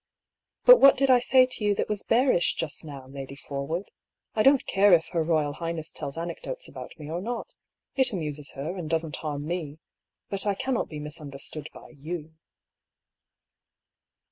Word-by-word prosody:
" - - -62
But - - +10
what 275 0 +8
did 270 0 +3
I 250 - +7
say 255 +1 +5
to 255 -3 -4
you 205 -1 +2
that - - -1
was 210 -2 -1
bearish 235 -7 +2
just 150 -4 -3
now, 140 -4 -9
Lady 135 0 -8
Forwood? 145 +7 -5 0.4
I 215 - +1
don't 270 +3 +5
care 195 0 +4
if 165 -1 +4
her 165 -2 0
Koyal 155 -3 +1
Highness 165 0 -4
tells 140 +2 -6
anecdotes 175 - -5
about - - -10
me 150 -2 -9
or 165 +3 -3
not 235 +4 -5 0.2
— - - -59
it 260 -1 +3
amuses 150 -6 -4
her, 155 +7 -4
and 170 -5 -5
doesn't 160 -1 -1
harm 145 -2 -4
me. 155 -3 -4 0.5
But 200 +1 -1
I 200 - +2
cannot 255 +4 -1
be 155 - -7
misunderstood 150 0 -5
by - - -13
yow." 160 +2 -7
165 Hz, 180 wpm, -27 LUFS, 150-205 Hz, 0.5 s, But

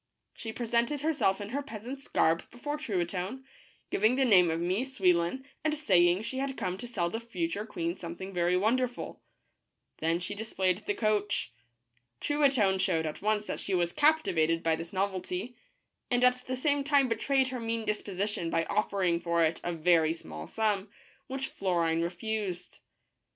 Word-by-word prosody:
She 225 - -6
presented 235 +5 0
herself 280 -11 +2
in 205 0 -6
her 280 +5 -2
peas 230 -6 -9
ant's 270 +2 -7
garb 165 +1 +2
before 290 +5 -4
Truitonne, 190 - -2 0.5
giving 220 +5 +3
the 265 0 +3
name 185 -7 +6
of 165 0 -1
Mie 180 +5 0
Souil 205 -10 +3
lon 175 +11 -2 0.2
and 310 -1 +1
saying 180 - +3
she 260 +3 -3
had 270 0 -2
come 180 0 -2
to 245 - -6
sell 175 -8 -1
the 225 - -2
future 205 -2 -3
queen 170 -3 -2
something 185 +2 -7
very 175 0 +2
wonderful. 245 +5 0 0.8
Then 165 +2 +1
she 180 +3 -4
displayed 195 -3 -1
the 205 - +1
coach. 210 - 0 0.7
Truitonne 270 -10 +3
showed 180 -4 +1
at 155 - -5
once 210 0 +1
that - - -3
she 195 - -1
was 175 -1 +1
captivated 170 - +3
by 165 -1 +3
this 165 +1 -7
novelty, 190 +3 -2 0.5
and 245 0 +2
at 250 0 +3
the 255 0 -2
same 285 +1 +1
time 280 -2 +4
betrayed 260 +3 +1
her 255 -1 -4
mean 230 -1 -2
disposition 205 -3 -2
by 165 0 +1
offering 190 -5 +1
for 170 -1 +2
it 160 +1 -1
a 175 - -1
very 165 -1 +3
small 80 - -8
sum, 210 -2 0 0.4
which 265 0 -3
Florine 170 -7 0
refused. 180 +1 -3
200 Hz, 170 wpm, -30 LUFS, 175-250 Hz, 0.8 s, name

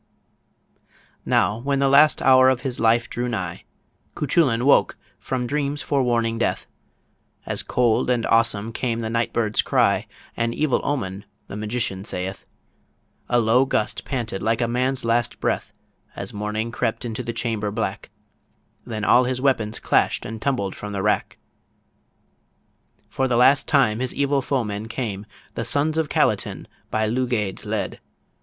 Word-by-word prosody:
Now 105 - +2
when 140 +3 -1
the 135 0 +2
last 145 +3 +5
hour 130 0 +6
of 130 -2 0
his 130 -3 -3
life 115 +1 +3
drew 125 0 -3
nigh, 90 -7 -4 0.5
Cuchullin 135 -5 +2
woke 140 - +4 0.2
from 130 -2 -3
dreams 145 +2 -2
forewarning 120 -5 0
death; - - -1 0.8
And - - -2
cold 120 -1 +2
and 120 -2 +1
awesome 115 -1 +1
came 115 -1 -2
the 110 -1 -3
night 115 0 0
bird's 110 -2 +1
cry - - +2 0.3
An 115 0 -1
evil 150 -4 +1
omen 100 -9 -3 0.2
the 100 - -9
magician 105 -2 -3
saith 95 -1 -5 0.8
A 120 - +3
low 120 +3 +4
gust 110 -5 -1
panted 115 -7 -3
like 110 +1 +1
a 120 - +1
man's 125 +1 -1
last 115 0 0
breath, - - -1 0.4
As - - -4
morning 105 +2 -3
crept 115 +1 -2
into 115 +1 -4
the 120 -1 -4
chamber 115 -3 -2
black; 100 -2 -4 0.7
Then 110 -2 -4
all 125 +3 +5
his 130 0 -1
weapons 115 -5 +1
clashed - - +1
and 110 0 -6
tumbled 115 -9 -1
from 105 0 -7
the 95 -1 -2
rack. 105 - 0 1.7
For 135 - -1
the 120 -2 +1
last 135 +4 +5
time 125 -7 +3
his 130 0 -2
evil 140 0 +1
foemen 110 -6 -2
came; 105 -4 -4 0.3
The - - -3
sons 150 +2 0
of 155 -2 -1
Calatin - - 0 0.2
by 110 0 0
Lugaid 115 -4 -1
led. - - -3
115 Hz, 150 wpm, -23 LUFS, 110-130 Hz, 1.7 s, hour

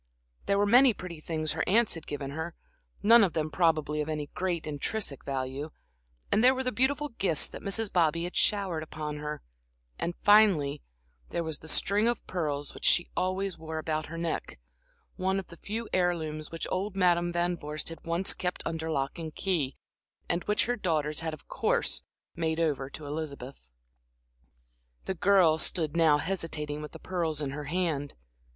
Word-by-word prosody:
There 200 - +3
were 205 - +3
many 245 +2 +6
pretty 175 -3 -7
things 155 -1 -2
her - - 0
aunts 225 +3 +4
had 165 -2 -7
given 140 -2 -4
her, 160 +3 -5 0.5
none 230 +2 +8
of 185 - +2
them 155 -1 -1
probably 155 -3 +2
of 150 - -3
any 150 -2 -3
great 180 -3 -1
intrinsic 150 - -2
value, 135 +2 -3 0.6
and 220 - +4
there 260 +1 +7
were 260 - -1
the 255 - +1
beautiful 285 +5 +1
gifts 190 - +1
that - - -8
Mrs. 205 +1 -2
Bobby 165 -1 +3
had 175 - -5
showered 195 -6 +2
upon 155 -1 -5
her; 150 0 -5 0.6
and, 175 - -2
finally, 190 -9 +5 0.5
there 170 - -1
was 160 -3 -2
the 160 - -12
string 205 +7 +3
of 240 -2 -1
pearls 145 -5 -2
which - - -12
she 175 - +4
always 185 0 -1
wore 160 0 -5
about 155 -1 -2
her 165 - -7
neck, 165 - -3 0.6
one 190 +1 +1
of 190 - -8
the 170 - -12
few 220 +6 -4
heirlooms 160 -4 0
which 165 - -4
old 195 +2 -1
Madam 175 -2 +3
Van 175 +1 +1
Vorst 150 -1 -4
had 165 - -9
once 170 +3 0
kept 180 0 -3
under 160 0 -3
lock 140 +1 -1
and 160 -2 -6
key, 160 -9 0 0.5
and 175 - 0
which 210 0 +2
her 245 - 0
daughters 155 -7 0
had 165 -1 -2
of 155 - -22
course - - 0 0.3
made 160 -1 -1
over 145 -5 0
to 150 +2 -8
Elizabeth. 140 - -6 1.4
The - - -1
girl 180 -4 +4
stood 160 -2 -1
now 160 -3 +5
hesitating 155 -3 -2
with 150 - -8
the - - -7
pearls 165 -5 -2
in 145 -3 -2
her 145 +1 -5
hand. 155 -3 -1
165 Hz, 180 wpm, -29 LUFS, 150-190 Hz, 1.4 s, none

